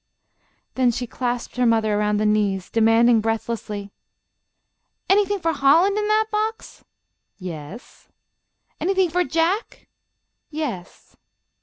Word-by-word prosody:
Then 255 -1 +2
she 245 +1 -2
clasped 245 0 -4
her 250 - +2
mother 220 -2 +2
around 210 0 +1
the 215 - 0
knees, 205 -3 0
demanding, 225 +1 +4
breathlessly: 220 -2 -4 1.2
"Anything 405 +1 +3
for 330 -3 -1
Holland 325 +8 +4
in 420 0 -1
that 430 +1 +2
box?" 435 +1 -3 0.5
"Yes." 180 +3 -10 0.7
"Anything 375 -2 +1
for 360 +2 +2
Jack?" 340 +7 -1 0.6
"Yes." 285 - -6
245 Hz, 110 wpm, -22 LUFS, -, 1.2 s, demanding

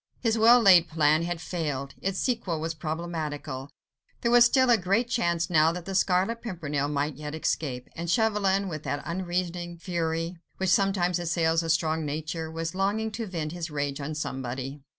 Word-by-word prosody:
His 230 -2 +1
well 230 +2 +7
laid 180 -6 +6
plan 155 0 +3
had 175 0 -3
failed, 145 -6 -3
its 195 0 -1
sequel 215 -11 -1
was 165 +1 -2
problematical; 155 -4 -4 0.5
there 235 - +1
was 240 0 +8
still 260 0 +4
a - - +7
great 200 +4 +1
chance 170 -9 0
now 160 -1 +4
that 175 0 -6
the 195 - -5
Scarlet 190 +4 +1
Pimpernel 150 -10 -2
might 145 -1 -2
yet 150 0 -6
escape, 135 -5 -2
and 170 +1 -4
Chauvelin, 200 -2 +2
with 155 -4 -5
that 145 -1 -3
unreasoning 175 -1 -3
fury, 165 0 -2 0.2
which 190 -1 0
sometimes 185 -3 +2
assails 165 -1 +1
a 165 - -4
strong 160 0 +1
nature, 155 +2 -4
was 165 0 -4
longing 205 +4 0
to 225 +1 -4
vent 165 -5 -4
his 175 -1 -5
rage 145 -1 -3
on 150 +2 -4
somebody. 135 -1 -4
170 Hz, 175 wpm, -27 LUFS, 155-190 Hz, 0.5 s, was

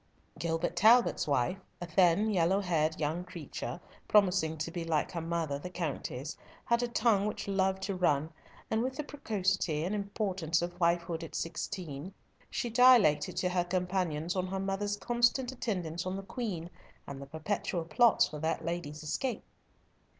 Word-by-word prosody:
Gilbert 165 +1 -1
Talbot's 225 +4 +5
wife, 140 +6 +1 0.2
a 175 - -4
thin, 180 +5 +3
yellow 185 0 +3
haired, 160 -5 0
young 160 +3 -1
creature, 170 -5 -6 0.3
promising 180 -6 +3
to 155 +2 -3
be 170 0 -4
like 160 -2 0
her 170 - -3
mother, 165 -4 -2
the 180 - -6
Countess, 155 -4 -4 0.3
had 235 0 +2
a 245 - 0
tongue 225 -4 +2
which 210 - -4
loved 190 -1 +1
to 195 - -1
run, 160 -4 +1 0.4
and 220 0 +2
with 260 +2 -2
the 300 - -3
precocity 195 - -1
and 185 +5 -1
importance 195 -5 -1
of 175 0 -3
wifehood 170 -1 +1
at 165 - -8
sixteen, 165 -1 -4 0.3
she 245 - -2
dilated 230 -12 +5
to 180 - +1
her 180 -1 +1
companions 180 -2 -1
on 185 0 0
her 190 +1 -3
mother's 195 +1 -1
constant 240 +3 +1
attendance 180 -10 -3
on 185 - -2
the 195 - -5
Queen, 190 -7 -4 0.3
and 140 -1 -7
the 140 - -8
perpetual 165 +2 -2
plots 235 +6 +4
for 150 - -7
that 160 +1 -1
lady's 165 -3 -4
escape. 245 - -2
180 Hz, 165 wpm, -31 LUFS, 160-205 Hz, 0.4 s, Talbot's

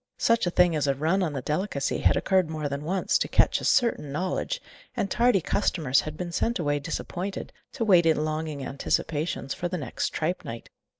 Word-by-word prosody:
Such 230 -5 +2
a - - +3
thing 175 -1 +3
as 145 -2 0
a 140 - +2
run 160 +8 +1
on 165 -5 -1
the 135 -3 -4
delicacy 150 -1 -1
had - - +3
occurred 185 -4 +2
more 155 -2 -3
than 140 +1 -4
once, 185 +4 +1
to - - 0
Ketch's - - +3
certain 230 - +2
knowledge, 185 - -2 0.4
and 200 - -1
tardy 240 -5 +3
customers 155 -7 +1
had 155 0 -7
been 175 0 -4
sent 230 +7 0
away 145 -4 0
disappointed, 175 +5 -5 0.2
to 230 - -2
wait 180 -5 +5
in 155 -1 +2
longing 155 -3 -3
anticipations 145 +1 -2
for 180 - -3
the 180 +1 -3
next 145 - -3
tripe 170 +4 -2
night. 115 0 -8
160 Hz, 195 wpm, -26 LUFS, 145-185 Hz, 0.4 s, wait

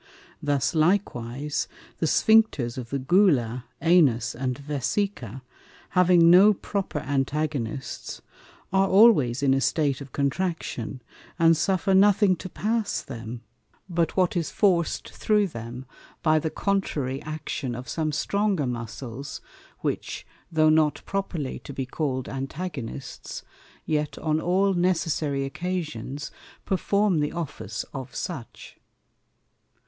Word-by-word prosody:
Thus 145 +1 +1
likewise 150 - 0 0.3
the 160 - +1
Sphincters 215 - +3
of 125 -3 -6
the 140 - -1
Gula, 130 - +2 0.2
Anus 140 -9 +4
and 125 0 -2
Vesica, 140 - -2 0.5
having 175 -2 +5
no 200 +4 +7
proper 195 -4 -3
Antagonists, 140 -2 -2 0.5
are 195 0 +4
always 170 - +5
in 135 -1 +4
a 135 - +1
State 145 -3 +1
of 135 -2 -9
Contraction, 140 -5 -2 0.3
and 165 -1 +5
suffer 190 +4 +1
nothing 200 0 +5
to 185 - -7
pass 215 +2 -1
them, 115 -2 -7 0.5
but 170 -2 -1
what 185 -1 +2
is 170 -3 0
forced 180 -5 +1
through 210 -1 +2
them 120 - -7 0.4
by 155 -1 +4
the 160 - -2
contrary 150 -10 -1
Action 150 -4 -4
of 125 +1 -7
some 155 -2 -1
stronger 200 +1 0
Muscles, 125 +3 -5 0.4
which, - - -3 0.3
though 155 -1 +4
not 155 -1 +3
properly 180 -8 -3
to 140 - -9
be 135 0 -3
call'd 130 -1 -2
Antagonists, 135 -2 -6 0.4
yet 150 -1 -1
on 155 0 0
all 190 +3 +2
necessary 160 -6 0
Occasions 150 -4 -4 0.3
perform 200 -1 +1
the 150 0 -1
Office 140 - -5
of 130 -2 -7
such. 160 -11 -7
155 Hz, 120 wpm, -26 LUFS, 130-185 Hz, 0.5 s, no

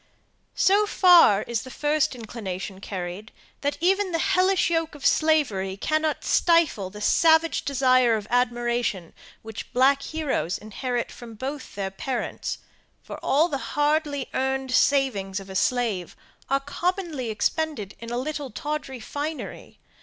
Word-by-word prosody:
So 410 +2 +4
far 345 - +6
is 235 -2 -2
the 260 - -10
first 295 0 0
inclination 195 -5 -6
carried, 190 +3 -6 0.3
that 285 0 -1
even 385 +2 +2
the - - +2
hellish 370 +3 +2
yoke 325 -2 0
of 290 - -9
slavery 240 -12 +2
cannot 310 +6 0
stifle 330 - +3
the 210 +2 -10
savage 320 +7 +4
desire 255 -3 +3
of 210 - -6
admiration 240 -6 0 0.3
which 220 -1 -7
the - - -28
black 270 +2 +4
heroes 285 - -2
inherit 240 +3 -4
from 230 -2 -11
both 270 +5 -6
their 195 -1 -3
parents, 250 +6 -4 0.5
for - - -8
all 300 +5 +3
the 280 -5 -3 0.2
hardly 295 -2 +1
earned 265 0 -1
savings 235 -9 +2
of 195 0 -10
a - - -8
slave 215 -5 0 0.3
are 275 +1 +2
commonly 325 - -2
expended 220 - -2
in 230 - -8
a 240 - -2
little 285 +1 -3
tawdry 290 +1 -5
finery. 295 +7 -6
265 Hz, 140 wpm, -25 LUFS, 215-310 Hz, 0.5 s, far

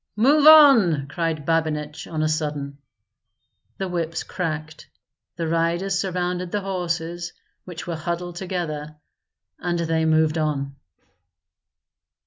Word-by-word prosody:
"Move 285 +7 +4
on!" 235 - +7
cried 160 -1 -3
Babinich, 150 -2 -1
on 155 -1 -2
a - - +2
sudden. 145 -3 -3 1.0
The 190 - -3
whips 165 -2 -3
cracked; 160 -3 -5 0.5
the 165 -1 -3
riders 170 +4 0
surrounded 180 -2 -2
the 205 - -1
horses, 175 -2 -3 0.3
which 175 -2 -8
were 170 - -3
huddled 175 +2 -4
together, 160 -5 -4 0.6
and 175 -1 -1
they 165 -1 0
moved 160 0 +2
on. 140 -3 -2
165 Hz, 115 wpm, -23 LUFS, 155-180 Hz, 1.0 s, on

